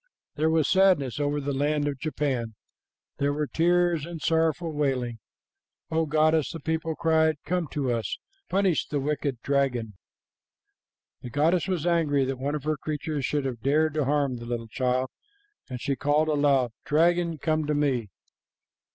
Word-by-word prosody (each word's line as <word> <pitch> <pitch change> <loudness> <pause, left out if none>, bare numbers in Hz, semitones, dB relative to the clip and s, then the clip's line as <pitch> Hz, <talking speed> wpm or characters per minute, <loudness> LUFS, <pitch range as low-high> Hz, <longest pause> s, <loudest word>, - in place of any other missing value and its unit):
There 155 +1 +1
was 160 -3 +2
sadness 180 -10 +3
over 145 0 0
the 140 0 -2
land 145 +2 0
of 140 -2 -3
Japan. 130 -7 -2 0.6
There 140 0 +1
were 150 +1 -1
tears 175 0 +2
and 170 +1 -6
sorrowful 160 +1 +1
wailing. 130 -6 -1 0.7
'O 160 0 +1
goddess,' 155 0 +2
the 165 - -6
people 160 0 -2
cried, 160 -1 +3
'come 180 -2 -1
to 135 -3 -2
us! 115 -2 -2 0.3
Punish 190 -3 +1
the 145 - -1
wicked 140 -2 -2
dragon!' 130 -6 0 1.3
"The 125 - -7
goddess 160 +7 +2
was 180 -4 -1
angry 155 -6 +2
that 130 -1 -3
one 140 +3 -1
of 150 - -4
her 155 0 0
creatures 150 -1 -3
should 145 0 -1
have 125 -4 -4
dared 155 +4 +2
to 150 -2 0
harm 140 -2 +1
the 120 - -8
little 115 -1 -4
child, 130 +1 0 0.6
and 125 -1 -5
she 140 +2 -1
called 150 +3 +1
aloud, 140 -5 +2
'Dragon, 170 +2 +2
come 155 +1 0
to 150 - +1
me.' 130 -7 0
150 Hz, 160 wpm, -26 LUFS, 135-160 Hz, 1.3 s, sadness